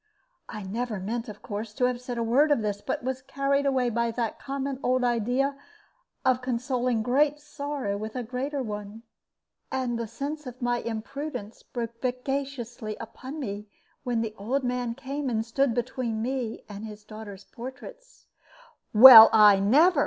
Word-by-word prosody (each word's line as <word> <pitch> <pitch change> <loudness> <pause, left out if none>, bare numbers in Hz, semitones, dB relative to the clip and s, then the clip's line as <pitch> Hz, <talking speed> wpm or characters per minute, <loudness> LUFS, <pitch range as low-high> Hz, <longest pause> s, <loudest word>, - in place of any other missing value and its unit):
I 215 -2 -6
never 215 +2 -3
meant, 230 +5 -4
of 210 0 -11
course, 210 +1 -6
to 250 - +2
have 250 -1 -1
said 250 -1 -5
a 235 - 0
word 265 +7 +3
of 285 -7 +2
this, 205 -1 -2
but - - -3
was 260 0 -3
carried 275 +1 0
away 255 -3 +1
by 235 +1 0
that 230 -1 -3
common 275 -1 -4
old 255 -1 +1
idea 245 +4 +1 0.7
of 255 -1 +3
consoling 250 -1 -1
great 285 +5 +2
sorrow 285 -7 -4
with 215 +2 -6
a 250 - -2
greater 260 +4 -3
one. 210 0 -7 0.7
And 250 -3 -1
the 230 - -3
sense 285 +5 -5
of 250 0 -9
my 245 -1 0
imprudence 230 0 -6
broke 230 -1 -6
vexatiously 250 -3 -3
upon 260 +6 -8
me 210 -5 -5 0.4
when 245 -3 0
the 220 -2 -3
old 260 +7 -1
man 245 -1 -2
came 275 +1 -4
and 225 -2 -1
stood 240 +1 +1
between 240 -2 -2
me 250 -3 -3
and 205 0 -8
his 210 -1 -9
daughter's 210 -2 -10
portraits. 265 - -11 0.7
"Well, 225 -1 +12
I 210 -2 +7
never!" 290 - +4
245 Hz, 165 wpm, -27 LUFS, 220-270 Hz, 0.7 s, Well